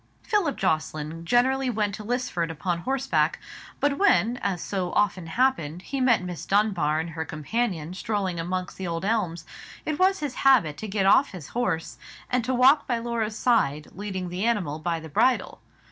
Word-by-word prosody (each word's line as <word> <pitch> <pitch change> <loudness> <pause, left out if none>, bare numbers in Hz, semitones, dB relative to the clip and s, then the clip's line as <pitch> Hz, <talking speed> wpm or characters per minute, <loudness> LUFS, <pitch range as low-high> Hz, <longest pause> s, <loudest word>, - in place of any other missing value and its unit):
Philip 405 - +1
Jocelyn 155 +1 -2
generally 260 +5 +2
went 210 -3 -1
to 210 - -6
Lisford 210 -8 -1
upon 170 +2 -2
horseback; 265 +6 0 0.4
but 285 0 +1
when, 250 - +3
as 195 -5 -2
so 185 0 -3
often 190 -4 +1
happened, 180 - 0
he 275 -1 -3
met 245 -6 +3
Miss 180 -2 -6
Dunbar 190 -7 +2
and 165 +1 -4
her 160 0 -3
companion 165 - -2
strolling 190 -2 -2
amongst 180 +2 -3
the 190 - -4
old 170 +2 -3
elms, 180 -7 -1 0.4
it 310 +1 -2
was 380 +1 +4
his 290 -6 -4
habit 240 - +4
to 220 - -5
get 195 -1 0
off 205 +5 +5
his 175 -7 -8
horse, 185 -10 -2 0.3
and 250 -1 +2
to 260 - 0
walk 265 +4 +5
by 240 - +1
Laura's 230 -2 -2
side, 150 - +1
leading 190 -2 -4
the 180 +3 -3
animal 195 -10 0
by 165 +1 -1
the 160 - -9
bridle. 250 - +1
200 Hz, 175 wpm, -26 LUFS, 170-245 Hz, 0.4 s, off